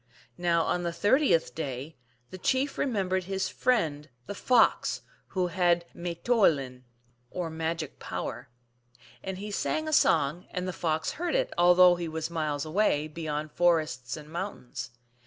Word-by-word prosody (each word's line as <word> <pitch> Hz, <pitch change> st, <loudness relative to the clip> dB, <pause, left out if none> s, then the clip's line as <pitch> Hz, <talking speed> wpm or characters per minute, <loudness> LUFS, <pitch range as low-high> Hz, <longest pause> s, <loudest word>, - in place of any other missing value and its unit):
Now 170 Hz, -1 st, +2 dB
on 175 Hz, -, 0 dB
the 170 Hz, -1 st, -2 dB
thirtieth 205 Hz, -, +2 dB
day 140 Hz, 0 st, -5 dB, 0.4 s
the 185 Hz, -, -8 dB
chief 260 Hz, +8 st, 0 dB
remembered 190 Hz, -7 st, 0 dB
his. 190 Hz, 0 st, -2 dB
friend 155 Hz, -12 st, 0 dB, 0.2 s
the -, -, -5 dB
Fox, 235 Hz, +3 st, +2 dB, 0.2 s
who 185 Hz, -1 st, -1 dB
had 175 Hz, -1 st, +2 dB
m -, -, -13 dB
9 175 Hz, -1 st, -3 dB
Moulin 145 Hz, -, +3 dB
(P.)> 125 Hz, -, -28 dB, 0.4 s
or 175 Hz, 0 st, -4 dB
magic 160 Hz, -1 st, -3 dB
power. -, -, -5 dB, 0.7 s
And 190 Hz, -1 st, -5 dB
he 205 Hz, +2 st, -6 dB
sang 310 Hz, +9 st, -1 dB
a 310 Hz, -, -2 dB
song, 150 Hz, -, +3 dB
and 180 Hz, 0 st, -3 dB
the 185 Hz, -, -3 dB
Fox 160 Hz, -2 st, -1 dB
heard 350 Hz, +8 st, -2 dB
it, -, -, 0 dB
although 180 Hz, 0 st, +6 dB
he 170 Hz, -1 st, -3 dB
was 160 Hz, +1 st, -4 dB
miles 155 Hz, -3 st, -2 dB
away, 155 Hz, -3 st, +1 dB
beyond 155 Hz, -1 st, -4 dB
forests 155 Hz, -8 st, +1 dB
and 150 Hz, -1 st, -10 dB
moun 170 Hz, -5 st, -6 dB
tains. 125 Hz, -2 st, -5 dB
175 Hz, 160 wpm, -28 LUFS, 155-190 Hz, 0.7 s, although